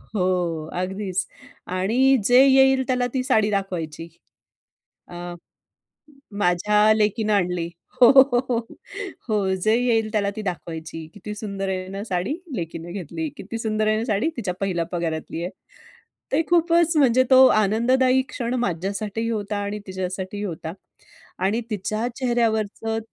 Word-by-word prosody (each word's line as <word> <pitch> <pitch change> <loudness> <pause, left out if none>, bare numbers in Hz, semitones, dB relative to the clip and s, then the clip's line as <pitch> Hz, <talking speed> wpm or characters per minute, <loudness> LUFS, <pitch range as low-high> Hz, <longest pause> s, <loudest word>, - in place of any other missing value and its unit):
हो. 175 -4 0
अगदीच. 190 0 -2 0.4
आणि 235 +9 +3
जे 250 +2 +7
येईल 265 0 +5
त्याला 250 -1 +1
ती 255 -1 0
साडी 220 -5 +2
दाखवायची. 170 -5 -3 1.0
अ, - - -11 1.3
"माझ्या 210 +4 +3
लेकीनं 215 0 +1
आणली." 180 -3 0 0.3
हो, 240 - +9
हो, 265 -2 +6
हो 235 -2 +2 0.7
हो. 200 -3 +1
जे 215 +4 +2
येईल 225 -3 +1
त्याला 205 -2 +1
ती 215 - -4
दाखवायची. 165 -4 -6
"किती 210 +1 -7
सुंदर 200 -2 -4
आहे 185 -1 -3
ना 195 +1 -5
साडी? 190 - -2 0.2
लेकीनं 165 -1 -5
घेतली. 165 -4 -4
किती 225 +4 -6
सुंदर 215 -1 -1
आहे 215 0 +2
ना 225 - -2
साडी? 215 +7 +1
तिच्या 195 -6 -2
पहिल्या 180 -4 -1
पगारातली 165 -1 -3
आहे." 180 - -3 0.8
ते 295 +4 +3
खूपच 340 -1 +3
म्हणजे 255 -2 +5
तो 260 0 +8
आनंददायी 255 +5 +3
क्षण 240 0 -3
माझ्यासाठीही 200 +3 -2
होता 210 -2 -2
आणि 205 +1 -4
तिच्यासाठीही 190 +2 -4
होता. 165 -3 -5 0.7
आणि 215 +5 +1
तिच्या 215 +3 -2
चेहऱ्यावरचं 225 -3 0
210 Hz, 135 wpm, -23 LUFS, 185-235 Hz, 1.3 s, हो